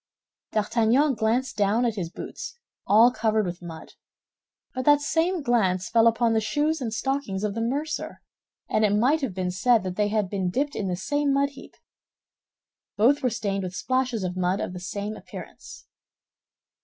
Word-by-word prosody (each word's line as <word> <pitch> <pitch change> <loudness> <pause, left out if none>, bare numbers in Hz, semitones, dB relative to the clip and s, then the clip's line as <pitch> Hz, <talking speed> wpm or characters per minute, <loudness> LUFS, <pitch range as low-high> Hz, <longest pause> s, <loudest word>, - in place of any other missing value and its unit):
D'Artagnan 230 +6 +2
glanced 235 +3 0
down 210 +4 +2
at 235 - +1
his 185 -6 -4
boots, 330 - -8 0.3
all 225 +4 +6
covered 220 -2 +1
with 175 0 -5
mud; 165 -2 -10 0.8
but 255 - -3
that 290 -1 +6
same 325 +3 0
glance 190 -8 +1
fell 230 +4 +5
upon 230 0 +2
the 220 - +2
shoes 295 +8 0
and 235 -3 -2
stockings 225 -4 -2
of 210 -1 -1
the 230 - -3
mercer, 285 +7 -3 0.5
and 215 - +1
it 205 -1 +3
might 270 +9 +3
have 240 -10 -3
been 185 -1 -1
said 225 +4 +3
they 190 +3 -1
had 210 -1 0
been 190 -1 -2
dipped 280 +9 -1
in 200 - -2
the 180 - -1
same 290 +9 0
mud 280 +1 +2
heap. 280 -1 -14 1.2
Both 255 +8 +4
were 255 - +2
stained 205 -3 -2
with 180 0 -5
splashes 255 +1 -1
of 180 0 -3
mud 185 +1 0
of - - -3
the 180 - -6
same 205 +3 -4
appearance. - - -11
220 Hz, 175 wpm, -25 LUFS, 195-260 Hz, 1.2 s, all